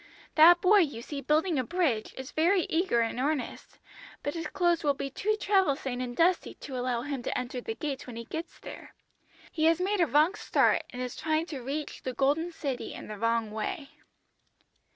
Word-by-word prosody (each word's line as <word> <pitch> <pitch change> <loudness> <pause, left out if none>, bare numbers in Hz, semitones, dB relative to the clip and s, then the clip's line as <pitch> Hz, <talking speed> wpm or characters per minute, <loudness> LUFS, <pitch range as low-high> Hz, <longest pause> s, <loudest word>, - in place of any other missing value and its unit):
That 340 +3 +7
boy 405 +3 +6
you 285 -10 0
see 285 +1 -5
building 310 +3 +1
a - - +1
bridge 275 -7 -1
is 265 +1 -7
very 350 +4 +3
eager 325 -8 +2
and 230 +1 -1
earnest, 285 0 -3 0.5
but 290 - -2
his 330 -2 -4
clothes 345 -1 +1
will 285 -2 +2
be 275 0 -4
too 430 +10 0
travel 385 -9 +3
stained 255 -2 -4
and 245 -1 -5
dusty 355 +2 +2
to 270 - -8
allow 245 -1 -1
him 280 -2 -4
to - - -2
enter 250 0 -4
the 225 - -5
gates 280 -2 -4
when 245 - -8
he 230 - -5
gets 325 +6 -6
there. - - -11 0.6
He 315 - 0
has 330 +1 +4
made 385 +1 +1
a 340 - +4
wrong 300 - +4
start, - - +2
and 250 0 -5
is 250 - -5
trying 315 +1 0
to 270 - -5
reach 285 +4 -5
the 255 - -4
Golden 295 +7 +1
City 275 -6 -4
in - - -9
the 210 - -6
wrong 230 -1 0
way.' 275 - -4
290 Hz, 205 wpm, -29 LUFS, 250-335 Hz, 0.6 s, That